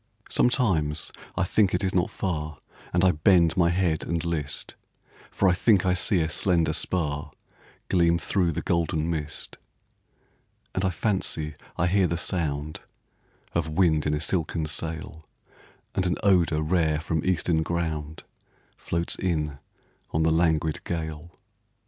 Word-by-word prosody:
Sometimes 85 - +2 0.3
I 95 - +2
think 95 0 +2
it 90 - -1
is 95 - 0
not 90 0 +2
far 75 -6 -3 0.3
And 90 +1 +2
I 90 - +6
bend 85 +1 +4
my 85 -2 +4
head 85 -3 +1
and 85 0 -2
list, 80 -4 -2 0.6
For 100 - +1
I 90 - +5
think 95 0 +3
I 90 - +3
see 90 0 +2
a 80 - +1
slender 85 +1 +1
spar 75 -5 -1 0.6
Gleam 85 -2 +3
through 90 -1 0
the 85 - -3
golden 85 -1 0
mist; 75 -2 -5 1.2
And 95 - -1
I 95 - +3
fancy 85 -4 -1 0.2
I 85 - +2
hear 95 +1 +3
the 85 - -1
sound 75 -4 -2 0.7
Of 80 -2 0
wind 80 -2 +2
in 75 - +1
a - - -2
silken 80 -1 -1
sail, 80 0 -4 0.7
And 95 - 0
an 90 - +1
odor 85 -6 +3
rare 80 -2 +1
from 80 0 -2
Eastern 85 -2 +1
ground, 80 -2 -3 0.5
Floats 85 0 -2
in 75 -6 -1 0.5
on 80 - 0
the 80 - +3
languid 80 -2 +1
gale. 80 0 -5
85 Hz, 145 wpm, -26 LUFS, 80-90 Hz, 1.2 s, I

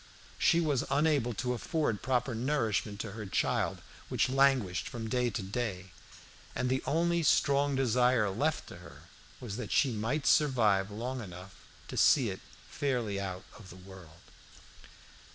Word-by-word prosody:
She 170 - +4
was 145 -5 +1
unable 140 -4 +1
to 125 +3 -1
afford 125 - -1
proper 130 0 0
nourishment 115 -5 -1
to 110 - -6
her 105 0 -7
child, - - -1 0.3
which - - +1
languished 130 -9 +2
from 115 -2 -6
day 125 +1 +1
to 100 -3 -4
day, 95 -3 -4 0.6
and 125 0 -1
the 130 - +1
only 170 +4 +1
strong 140 -1 +2
desire 125 -4 +2
left 150 +10 -1
to - - -10
her 85 -1 -14 0.4
was 110 -4 -6
that 115 -5 -6
she 135 - +3
might 115 +7 -2
survive 110 -10 +3
long 120 +5 -4
enough 95 -1 -10 0.3
to - - -7
see - - +4
it - - -7 0.3
fairly 120 -8 -2
out 95 -1 -5 0.2
of 100 -3 -13
the 90 - -11
world. 90 -3 -14
120 Hz, 150 wpm, -31 LUFS, 100-135 Hz, 0.6 s, She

